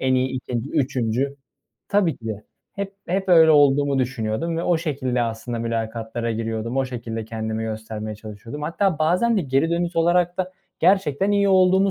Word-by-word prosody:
en 130 0 +2
iyi 130 +1 +2
2’nci, 125 0 -4
3'üncü 130 0 0 0.5
Tabii 195 -7 +2
ki 115 - -11
de. 105 -1 -5 0.3
Hep 200 0 -5
hep 190 +2 -1
öyle 165 -2 +7
olduğumu 145 -2 +4
düşünüyordum 130 +5 -1
ve 165 - -1
o 175 -2 +2
şekilde, 130 -6 -1
aslında, 115 +1 -3
mülakatlara 115 0 -3
giriyordum. 115 +2 -3
O 135 - +2
şekilde, 115 -3 -5
kendimi 110 0 -4
göstermeye 110 -1 -5
çalışıyordum. 110 +6 -9
Hatta 170 +2 0
bazen 180 +9 +2
de 195 - +1
geri 135 +4 +1
dönüş 170 0 -1
olarak 175 +1 +2
da 185 0 -2 0.3
gerçekten 190 -1 +3
iyi 200 -1 +3
olduğumu 190 +1 +4
135 Hz, 165 wpm, -23 LUFS, 115-175 Hz, 0.5 s, öyle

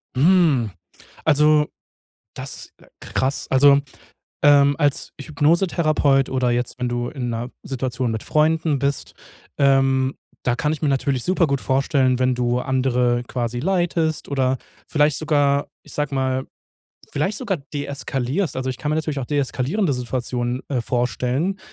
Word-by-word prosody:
Mm. 150 - +4 0.6
Also, 150 0 +4 0.7
das, - - -6
äh - - -19
krass. 135 +1 -1
Also, 140 +1 +6 0.6
ähm, 145 -1 +5
als 145 -3 0
Hypnosetherapeut 155 -2 +2
oder 130 -2 +1
jetzt, 120 +1 -2
wenn 125 -1 -1
du 120 0 -2
in 125 -4 -4
'ner 115 +2 -4
Situation 130 -2 -2
mit 110 - -4
Freunden 155 -1 +1
bist, 140 +1 -2 0.4
ähm, 135 -1 +3 0.3
da 120 - +2
kann 150 +4 0
ich 155 - -4
mir 150 - +2
natürlich 135 -2 0
super 185 -2 +2
gut 140 -2 -1
vorstellen, 130 -1 +1
wenn 130 0 +2
du 120 0 0
andere 125 -2 +1
quasi 120 -1 -3
leitest 170 -2 0
oder 130 -2 +1 0.3
vielleicht 150 -2 +2
sogar, 145 -2 +1
ich - - -14
sag 150 -1 -2
mal, 130 -1 -1 0.7
vielleicht 185 +9 -1
sogar 205 -8 -2
deeskalierst. 140 +3 -2
Also 130 0 -2
ich 130 - -3
kann 145 +4 -3
mir 155 - +1
natürlich 155 -2 -2
auch 130 - -3
deeskalierende 145 - 0
Situationen, 125 0 -2
äh, 130 -4 -1
vorstellen, 125 - -1
135 Hz, 145 wpm, -22 LUFS, 125-150 Hz, 0.7 s, Also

